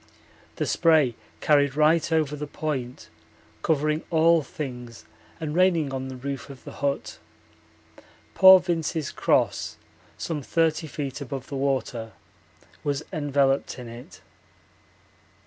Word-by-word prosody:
The -, -, -1 dB
spray 155 Hz, -7 st, +3 dB, 0.3 s
carried 145 Hz, -2 st, +3 dB
right 155 Hz, +1 st, +3 dB
over 155 Hz, -2 st, +1 dB
the 150 Hz, 0 st, -5 dB
Point 135 Hz, -5 st, -4 dB, 0.5 s
covering 155 Hz, 0 st, +1 dB
all 165 Hz, 0 st, +4 dB
things 125 Hz, -5 st, -7 dB, 0.3 s
and 155 Hz, -2 st, -4 dB
raining 170 Hz, -5 st, +2 dB
on 130 Hz, 0 st, -3 dB
the 130 Hz, -, -7 dB
roof 135 Hz, +2 st, -6 dB
of 135 Hz, -2 st, -11 dB
the -, -, -9 dB
hut. 140 Hz, 0 st, -3 dB, 1.1 s
Poor 190 Hz, 0 st, +9 dB
Vince's 165 Hz, -4 st, -2 dB
cross, -, -, 0 dB, 0.4 s
some 160 Hz, -3 st, -3 dB
30 160 Hz, +2 st, 0 dB
feet 140 Hz, -4 st, -5 dB
above 135 Hz, -1 st, -5 dB
the 140 Hz, -, -5 dB
water, 130 Hz, -5 st, -2 dB, 0.7 s
was 145 Hz, +1 st, -1 dB
enveloped 140 Hz, -3 st, +1 dB
in 125 Hz, -2 st, -8 dB
it. 115 Hz, +2 st, -11 dB
145 Hz, 120 wpm, -25 LUFS, 135-160 Hz, 1.1 s, Poor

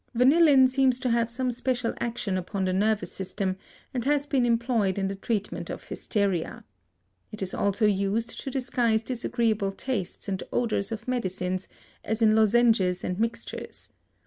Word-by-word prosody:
Vanillin 270 Hz, +1 st, +6 dB
seems 260 Hz, -1 st, +2 dB
to 250 Hz, -, 0 dB
have 235 Hz, 0 st, +2 dB
some 250 Hz, +2 st, -1 dB
special 245 Hz, -1 st, -1 dB
action 230 Hz, -5 st, -2 dB
upon 190 Hz, +1 st, -2 dB
the 185 Hz, -, 0 dB
nervous 210 Hz, +2 st, +1 dB
system, 190 Hz, 0 st, -3 dB, 0.4 s
and 245 Hz, -3 st, -2 dB
has 285 Hz, +1 st, +1 dB
been 265 Hz, -4 st, +1 dB
employed 230 Hz, -5 st, +1 dB
in 195 Hz, -1 st, 0 dB
the 195 Hz, -, -3 dB
treatment 205 Hz, +1 st, -3 dB
of -, -, -6 dB
hysteria. 200 Hz, -6 st, -2 dB, 0.7 s
It 215 Hz, -2 st, -5 dB
is 190 Hz, -, -2 dB
also 200 Hz, +2 st, +1 dB
used 205 Hz, +3 st, 0 dB
to -, -, -5 dB
disguise 245 Hz, -4 st, 0 dB
disagreeable 230 Hz, -4 st, 0 dB
tastes 205 Hz, -3 st, -4 dB
and 190 Hz, -1 st, -2 dB
odors 225 Hz, -3 st, 0 dB
of 225 Hz, +1 st, -6 dB
medicines, 185 Hz, -6 st, -2 dB, 0.4 s
as 220 Hz, +1 st, -2 dB
in 215 Hz, -1 st, +5 dB
lozenges 220 Hz, -4 st, +3 dB
and 180 Hz, +2 st, -3 dB
mixtures. 230 Hz, +1 st, -4 dB
225 Hz, 155 wpm, -27 LUFS, 195-245 Hz, 0.7 s, Vanillin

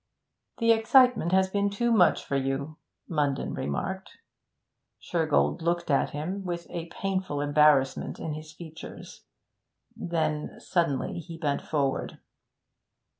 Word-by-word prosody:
'The 230 Hz, -1 st, +4 dB
excitement 230 Hz, -4 st, +4 dB
has 190 Hz, 0 st, +4 dB
been 200 Hz, 0 st, +1 dB
too 235 Hz, +4 st, 0 dB
much 190 Hz, -6 st, +4 dB
for 140 Hz, -, -2 dB
you,' 135 Hz, +3 st, -2 dB, 0.3 s
Munden 145 Hz, -4 st, -1 dB
remarked. 190 Hz, -, -4 dB, 0.8 s
Shergold 165 Hz, 0 st, +1 dB
looked 170 Hz, -1 st, 0 dB
at 140 Hz, -, +2 dB
him, 180 Hz, +7 st, -4 dB
with 175 Hz, -2 st, -4 dB
a 170 Hz, -1 st, -4 dB
painful 185 Hz, -4 st, -2 dB
embarrassment 145 Hz, -2 st, +3 dB
in 155 Hz, -, -4 dB
his 155 Hz, 0 st, -8 dB
features; 160 Hz, 0 st, -11 dB, 0.7 s
then 160 Hz, -3 st, -2 dB
suddenly 165 Hz, -4 st, -1 dB
he 165 Hz, 0 st, -9 dB
bent 145 Hz, -4 st, -1 dB
forward. 140 Hz, -3 st, -1 dB
165 Hz, 120 wpm, -27 LUFS, 145-190 Hz, 0.8 s, The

